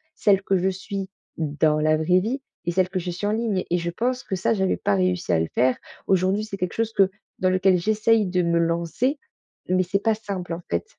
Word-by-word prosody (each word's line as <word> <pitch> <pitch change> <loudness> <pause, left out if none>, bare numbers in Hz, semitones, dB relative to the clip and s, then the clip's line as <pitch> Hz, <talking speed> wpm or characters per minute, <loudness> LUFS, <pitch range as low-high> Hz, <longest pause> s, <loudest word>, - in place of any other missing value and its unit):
celle 195 -1 +3
que 195 - +2
je 185 +1 +1
suis, 190 0 -5 0.3
dans 155 0 +1
la 155 0 +3
vraie 180 +4 +3
vie 250 +7 -2 0.2
et 175 - 0
celle 185 +1 +1
que 185 -1 -2
je 180 - -4
suis 180 +4 -4
en 210 - +1
ligne. 220 -4 0
Et 175 - +3
je 170 - -2
pense 250 +6 -1
que 190 - -3
ça, 190 +5 +1
j'avais 190 -3 +1
pas 205 - 0
réussi 180 - 0
à 85 - +3
le 80 - 0
faire. 125 +1 +3 0.3
Aujourd'hui 190 +2 +2
c'est 200 -2 -6
quelque 180 -2 -2
chose 225 0 -1
que 195 -1 +4 0.3
dans 185 - +2
lequel 185 0 +3
j'essaie 215 +2 +2
de 180 -1 0
me 170 0 +2
lancer. 170 - 0 0.5
Mais 185 0 +3
c'est 190 +2 0
pas 225 - +3
simple 200 -5 -6
en 170 - -5
fait. 85 0 -1
185 Hz, 235 wpm, -24 LUFS, 170-205 Hz, 0.5 s, que